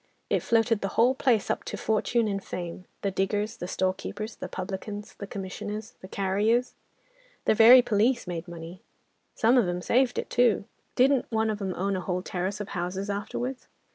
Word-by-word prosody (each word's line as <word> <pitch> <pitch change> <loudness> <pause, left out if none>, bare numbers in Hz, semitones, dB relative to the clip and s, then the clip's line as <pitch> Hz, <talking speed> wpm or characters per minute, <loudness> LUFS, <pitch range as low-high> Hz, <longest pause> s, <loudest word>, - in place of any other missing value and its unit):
It - - +3
floated 225 -1 +2
the 195 - 0
whole 245 +3 +5
place 250 -5 +2
up - - -2
to - - -5
fortune 220 +1 +1
and 195 -1 -2
fame, 175 0 -6 0.2
the 200 - 0
diggers, 205 +4 -1
the 175 - -5
storekeepers, 190 +4 -3
the - - -5
publicans, 200 +3 -6
the 200 - -8
commissioners, 205 +3 -6
the 185 - -9
carriers, 205 +6 +1 0.7
the - - +5
very 235 +3 +9
police 235 +3 +2
made 175 -1 -5
money: 170 +1 -9 0.5
some 240 +3 +4
of 220 - +2
'em 175 0 -1
saved 250 0 +2
it - - -3
too. 240 -5 +3 0.3
Didn't 265 +1 +3
one 220 -1 +1
of 210 -1 -5
'em 190 -2 -2
own 195 +2 -1
a 185 - -2
whole 180 0 -2
terrace 190 +3 -3
of 205 - -5
houses 190 +2 -3
afterwards? 240 +6 -4
205 Hz, 180 wpm, -27 LUFS, 190-230 Hz, 0.7 s, very